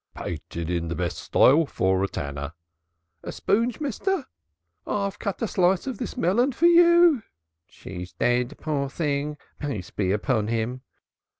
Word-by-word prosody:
"Painted 85 Hz, 0 st, -5 dB
in 85 Hz, -1 st, -1 dB
the 85 Hz, -, -3 dB
best 85 Hz, +1 st, -3 dB
style, 150 Hz, +4 st, +4 dB
for 95 Hz, -4 st, +1 dB
a -, -, +1 dB
tanner 70 Hz, -2 st, -5 dB, 0.4 s
" -, -, -52 dB, 0.3 s
"A -, -, -5 dB
spoonge, 230 Hz, +4 st, 0 dB
mister?" 305 Hz, -, -1 dB, 0.6 s
"I'll 200 Hz, -1 st, -1 dB
cut 200 Hz, +2 st, -4 dB
a -, -, +1 dB
slice 185 Hz, -1 st, +2 dB
of 260 Hz, -6 st, -4 dB
this -, -, -5 dB
melon 240 Hz, +10 st, +2 dB
for 335 Hz, -, +1 dB
you 345 Hz, -4 st, +6 dB
for -, -, -31 dB, 0.2 s
" 80 Hz, +1 st, -57 dB
"She's 90 Hz, 0 st, -9 dB
dead, 125 Hz, +3 st, 0 dB
poor 145 Hz, -3 st, -2 dB
thing, 150 Hz, 0 st, -2 dB, 0.2 s
peace 130 Hz, -, -4 dB
be 95 Hz, -3 st, -1 dB
upon 105 Hz, +1 st, 0 dB
him." 115 Hz, +3 st, -2 dB
140 Hz, 165 wpm, -25 LUFS, -, 0.6 s, you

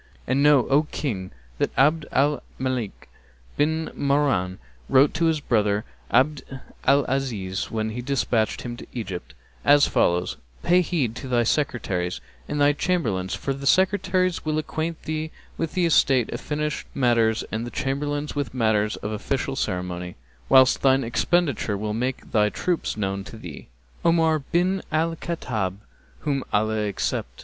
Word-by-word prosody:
And 130 Hz, +3 st, +1 dB
know, 145 Hz, -3 st, +5 dB
O 150 Hz, +3 st, +3 dB
King, 95 Hz, -10 st, -3 dB, 0.3 s
that -, -, +2 dB
Abd 150 Hz, +3 st, +3 dB
al 145 Hz, +2 st, +2 dB, 0.2 s
Malik 130 Hz, -5 st, -3 dB, 0.5 s
bin 160 Hz, +2 st, 0 dB
Marwán 140 Hz, -11 st, +1 dB, 0.3 s
wrote 135 Hz, +2 st, +5 dB
to 165 Hz, +1 st, +1 dB
his 160 Hz, -2 st, +2 dB
brother 105 Hz, -5 st, +1 dB, 0.2 s
Abd 135 Hz, +4 st, +3 dB, 0.4 s
al 140 Hz, 0 st, +4 dB
Azíz, 110 Hz, -8 st, -2 dB
when 110 Hz, -1 st, -2 dB
he 120 Hz, +3 st, -4 dB
despatched 120 Hz, -4 st, 0 dB
him 120 Hz, -1 st, -5 dB
to -, -, -10 dB
Egypt, 100 Hz, -7 st, -6 dB, 0.3 s
as 145 Hz, 0 st, +6 dB
follows, 90 Hz, +1 st, +1 dB, 0.3 s
'Pay 180 Hz, +1 st, +5 dB
heed 145 Hz, -10 st, -1 dB
to 135 Hz, -, -6 dB
thy 120 Hz, -2 st, +2 dB
Secretaries 105 Hz, -9 st, -1 dB, 0.3 s
and 150 Hz, -, -2 dB
thy 145 Hz, 0 st, +5 dB
Chamberlains, 115 Hz, -, -1 dB
for 135 Hz, -, -2 dB
the 140 Hz, +1 st, -5 dB
Secretaries 185 Hz, 0 st, +2 dB
will 155 Hz, -1 st, -1 dB
acquaint 160 Hz, +1 st, -3 dB
thee 155 Hz, 0 st, -3 dB, 0.3 s
with 165 Hz, +2 st, -4 dB
estate 140 Hz, -8 st, +3 dB
fished 150 Hz, 0 st, -3 dB
matters 115 Hz, -4 st, +2 dB
and 110 Hz, +1 st, -2 dB
the 120 Hz, -, -5 dB
Chamberlains 145 Hz, +3 st, -2 dB
with 140 Hz, -4 st, -3 dB
matters 110 Hz, -3 st, +2 dB
of 105 Hz, -, -5 dB
official 135 Hz, +5 st, -2 dB
ceremony, 90 Hz, -4 st, -3 dB, 0.3 s
whilst 130 Hz, -1 st, +6 dB
thine 135 Hz, 0 st, +4 dB
expenditure 125 Hz, -, +1 dB
will 105 Hz, +1 st, -3 dB
make 125 Hz, +4 st, -3 dB
thy 105 Hz, -2 st, +3 dB
troops 175 Hz, -1 st, -2 dB
known 100 Hz, -1 st, -2 dB
to 110 Hz, -, -10 dB
thee.' 85 Hz, -9 st, -9 dB, 0.4 s
Omar 165 Hz, -2 st, +3 dB
bin 180 Hz, +6 st, 0 dB
Al 165 Hz, +1 st, +1 dB
Khattáb[FN#263] 110 Hz, -, -3 dB, 0.4 s
(whom 140 Hz, -3 st, -1 dB
Allah 110 Hz, 0 st, +1 dB
accept!) -, -, -3 dB
135 Hz, 150 wpm, -24 LUFS, 110-150 Hz, 0.5 s, as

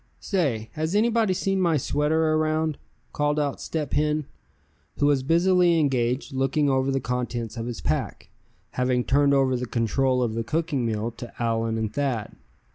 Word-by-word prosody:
"Say, 135 Hz, -, -1 dB
has 160 Hz, +4 st, -2 dB
anybody 220 Hz, -2 st, +2 dB
seen 195 Hz, +1 st, 0 dB
my 170 Hz, -4 st, +3 dB
sweater 155 Hz, +3 st, +1 dB
around?" 155 Hz, -1 st, 0 dB, 0.3 s
called 150 Hz, 0 st, 0 dB
out 145 Hz, -2 st, -2 dB
Step 155 Hz, -3 st, -3 dB
Hen, 150 Hz, 0 st, +1 dB, 0.7 s
who 145 Hz, -, +2 dB
was 145 Hz, -2 st, +3 dB
busily 170 Hz, +3 st, +3 dB
engaged 130 Hz, -1 st, 0 dB
looking 135 Hz, +3 st, +1 dB
over 130 Hz, 0 st, +1 dB
the 135 Hz, 0 st, +1 dB
contents 120 Hz, -2 st, -3 dB
of 115 Hz, 0 st, -4 dB
his 120 Hz, -2 st, -5 dB
pack, -, -, -3 dB, 0.4 s
having 125 Hz, -1 st, 0 dB
turned 140 Hz, +1 st, +3 dB
over 135 Hz, -1 st, +2 dB
the 125 Hz, 0 st, -3 dB
control 125 Hz, +3 st, +1 dB
of 115 Hz, -2 st, -1 dB
the 115 Hz, +1 st, -2 dB
cooking 145 Hz, -1 st, -1 dB
meal 110 Hz, +1 st, -2 dB
to 120 Hz, -, -8 dB
Allan 115 Hz, -1 st, 0 dB
and 110 Hz, -1 st, -2 dB
Thad. 135 Hz, -7 st, -2 dB
140 Hz, 165 wpm, -25 LUFS, 120-155 Hz, 0.7 s, my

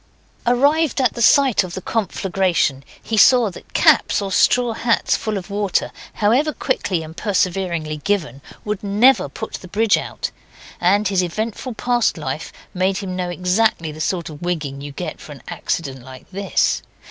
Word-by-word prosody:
Arrived 285 Hz, +4 st, +3 dB
at 255 Hz, -4 st, +2 dB
the 235 Hz, -, -5 dB
site 265 Hz, -1 st, +5 dB
of 180 Hz, -2 st, -7 dB
the -, -, -3 dB
conflagration, 185 Hz, -9 st, 0 dB, 0.2 s
he 225 Hz, -, -2 dB
saw 235 Hz, -1 st, +6 dB
that -, -, -13 dB
caps -, -, +4 dB
or 200 Hz, -1 st, -4 dB
straw 245 Hz, +4 st, +3 dB
hats 230 Hz, 0 st, +1 dB
full 215 Hz, -2 st, -2 dB
of 195 Hz, +1 st, -7 dB
water, 200 Hz, -2 st, 0 dB, 0.2 s
however 245 Hz, +9 st, +2 dB
quickly 190 Hz, -10 st, -1 dB
and 160 Hz, +1 st, -10 dB
perseveringly 180 Hz, -6 st, -1 dB
given, 150 Hz, -6 st, -2 dB, 0.2 s
would 210 Hz, 0 st, -3 dB
never 215 Hz, +7 st, +4 dB
put 220 Hz, -, -7 dB
the 185 Hz, -, -10 dB
bridge 215 Hz, +4 st, +2 dB
out, -, -, -5 dB, 0.5 s
and 200 Hz, +3 st, +3 dB
his 190 Hz, -2 st, +2 dB
eventful 220 Hz, +7 st, -4 dB
past 240 Hz, 0 st, +1 dB
life -, -, -5 dB, 0.2 s
made 190 Hz, 0 st, 0 dB
him 190 Hz, -2 st, -4 dB
know 180 Hz, -1 st, -2 dB
exactly 180 Hz, -1 st, +1 dB
the 155 Hz, +1 st, -8 dB
sort 175 Hz, 0 st, -1 dB
of 150 Hz, -2 st, -10 dB
wigging 155 Hz, -6 st, -3 dB
you 145 Hz, 0 st, -7 dB
get 140 Hz, -, -6 dB
for -, -, -9 dB
an -, -, -15 dB
accident 135 Hz, -5 st, -3 dB
like 130 Hz, 0 st, -12 dB
this. 195 Hz, +1 st, 0 dB
195 Hz, 170 wpm, -20 LUFS, 175-225 Hz, 0.5 s, saw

